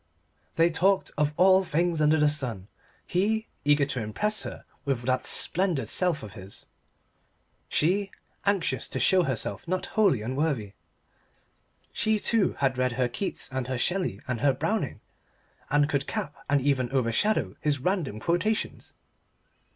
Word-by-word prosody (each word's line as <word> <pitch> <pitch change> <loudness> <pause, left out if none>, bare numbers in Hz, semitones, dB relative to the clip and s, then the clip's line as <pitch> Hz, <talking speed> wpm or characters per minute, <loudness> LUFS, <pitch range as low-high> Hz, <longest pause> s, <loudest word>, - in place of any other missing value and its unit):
They 165 0 +4
talked 190 +4 +2
of 150 0 +1
all 190 +1 +6
things 170 -1 0
under 155 +1 +4
the 150 -1 +4
sun: 125 -10 -2 0.4
he, 220 +5 0
eager 145 0 +4
to 130 -3 -3
impress 210 - -1
her - - -7 0.2
with 135 -4 -1
that 130 +1 0
splendid 170 - +3
self 180 -7 +1
of 105 -2 -9
his; 95 -2 -7 1.0
she, 195 +6 +1 0.3
anxious 200 -4 0
to - - -4
show 190 -1 +4
herself 130 - -2
not 185 +2 -1
wholly 195 - +3
unworthy. 130 -4 -1 1.2
She, 220 0 +1
too, 215 -3 +1
had 135 -2 0
read 125 -1 +1
her 125 0 +1
Keats 190 +11 -4
and 130 -1 -3
her 130 -1 -2
Shelley 175 - -1
and 125 -3 -2
her 140 -1 +4
Browning - - -2 0.7
and 145 0 +3
could 140 -2 -1
cap 145 - -3 0.2
and 145 0 +3
even 130 -3 +1
overshadow 125 - +1
his 150 -1 +1
random 150 - -1
quotations. 180 - -1
150 Hz, 145 wpm, -27 LUFS, 130-185 Hz, 1.2 s, all